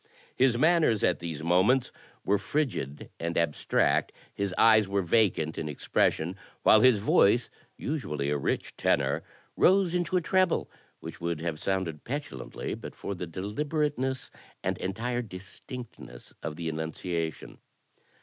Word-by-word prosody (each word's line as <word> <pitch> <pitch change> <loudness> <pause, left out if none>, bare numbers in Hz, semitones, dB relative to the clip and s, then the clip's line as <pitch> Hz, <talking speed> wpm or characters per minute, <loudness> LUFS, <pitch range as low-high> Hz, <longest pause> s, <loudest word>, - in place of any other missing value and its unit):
His 125 -2 +3
manners 155 - +3
at - - +2
these 80 -3 -5
moments 95 +10 +3 0.3
were 100 0 +2
frigid 115 - -2
and 85 0 -2
abstract; 85 -3 +1 0.2
his 100 -1 -2
eyes 110 -2 +6
were 100 0 0
vacant 85 -5 +2
in 75 - -3
expression; 80 +4 0 0.3
while 110 - +7
his 130 -2 +6
voice, 105 +3 +3 0.3
usually 75 - -2
a - - +1
rich - - -2
tenor, - - +1 0.3
rose 190 -2 +4
into 180 +1 +1
a - - +1
treble 185 +2 +1 0.3
which - - -9
would 85 -2 -2
have 80 -2 -3
sounded 95 -6 -2
petulantly 145 +3 -5
but - - -8
for 100 - -5
the 90 -2 -5
deliberateness 130 - -2 0.3
and - - -1
entire 120 +6 -2
distinctness 100 - -10
of 75 - -4
the 85 0 -5
enunciation. 80 +1 -4
100 Hz, 135 wpm, -28 LUFS, 85-130 Hz, 0.3 s, while